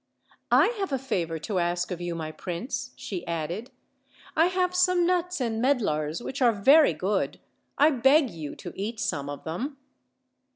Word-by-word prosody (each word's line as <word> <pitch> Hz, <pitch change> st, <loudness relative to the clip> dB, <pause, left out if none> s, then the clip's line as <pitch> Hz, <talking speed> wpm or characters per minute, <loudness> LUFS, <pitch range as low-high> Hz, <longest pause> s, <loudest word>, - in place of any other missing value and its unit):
"I -, -, +5 dB
have 390 Hz, -5 st, -2 dB
a 270 Hz, -, +1 dB
favor 180 Hz, -11 st, -2 dB
to 185 Hz, +4 st, -2 dB
ask 175 Hz, +1 st, -1 dB
of 175 Hz, -1 st, -4 dB
you, 175 Hz, -1 st, -3 dB
my 160 Hz, -1 st, -4 dB
prince," 190 Hz, -, -5 dB
she 180 Hz, -4 st, -5 dB
added; 170 Hz, +8 st, -3 dB, 0.7 s
"I 325 Hz, +2 st, +5 dB
have 365 Hz, 0 st, 0 dB
some 360 Hz, -1 st, +3 dB
nuts 360 Hz, -1 st, 0 dB
and 230 Hz, -3 st, -1 dB
medlars 180 Hz, -, 0 dB
which 265 Hz, +1 st, -5 dB
are 245 Hz, -2 st, +6 dB
very 275 Hz, +9 st, +5 dB
good; 195 Hz, +1 st, -1 dB, 0.4 s
I 300 Hz, +3 st, +5 dB
beg 270 Hz, 0 st, +4 dB
you 155 Hz, -4 st, -7 dB
to 175 Hz, -4 st, -8 dB
eat 215 Hz, +3 st, -4 dB
some 145 Hz, -9 st, -2 dB
of 145 Hz, -, -7 dB
them." 250 Hz, -, -4 dB
220 Hz, 170 wpm, -27 LUFS, 170-280 Hz, 0.7 s, are